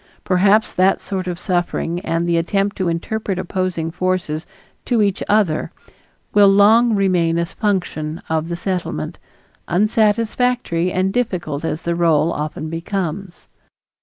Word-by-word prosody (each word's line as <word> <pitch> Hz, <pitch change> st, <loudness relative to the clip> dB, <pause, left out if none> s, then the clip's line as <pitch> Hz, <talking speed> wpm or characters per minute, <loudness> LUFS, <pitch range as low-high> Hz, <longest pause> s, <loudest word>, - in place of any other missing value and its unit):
Perhaps 195 Hz, +4 st, +3 dB
that 185 Hz, +1 st, +3 dB
sort 185 Hz, -2 st, -4 dB
of 175 Hz, -1 st, -4 dB
suffering 175 Hz, -2 st, -1 dB
and 170 Hz, -2 st, -1 dB
the 170 Hz, -, +2 dB
attempt 195 Hz, +4 st, 0 dB
to 185 Hz, -, -1 dB
interpret 195 Hz, +4 st, -2 dB
opposing 185 Hz, -3 st, -2 dB
forces 180 Hz, -3 st, -2 dB, 0.4 s
to 235 Hz, -4 st, +2 dB
each 200 Hz, -2 st, 0 dB
other 205 Hz, -7 st, +1 dB, 0.6 s
will 205 Hz, -1 st, +6 dB
long 215 Hz, +4 st, +5 dB
remain 180 Hz, -4 st, +2 dB
a 170 Hz, -, +1 dB
function 175 Hz, -5 st, -2 dB
of 160 Hz, +1 st, -1 dB
the 170 Hz, -, -2 dB
Settlement, 180 Hz, 0 st, -3 dB, 0.5 s
unsatisfactory 215 Hz, -1 st, +1 dB
and 185 Hz, +2 st, 0 dB
difficult 180 Hz, -11 st, -2 dB
as 160 Hz, -1 st, -3 dB
the 170 Hz, -, 0 dB
role 165 Hz, -1 st, +2 dB
often 155 Hz, +1 st, -4 dB
becomes. 175 Hz, +2 st, -4 dB
185 Hz, 135 wpm, -19 LUFS, 170-205 Hz, 0.6 s, will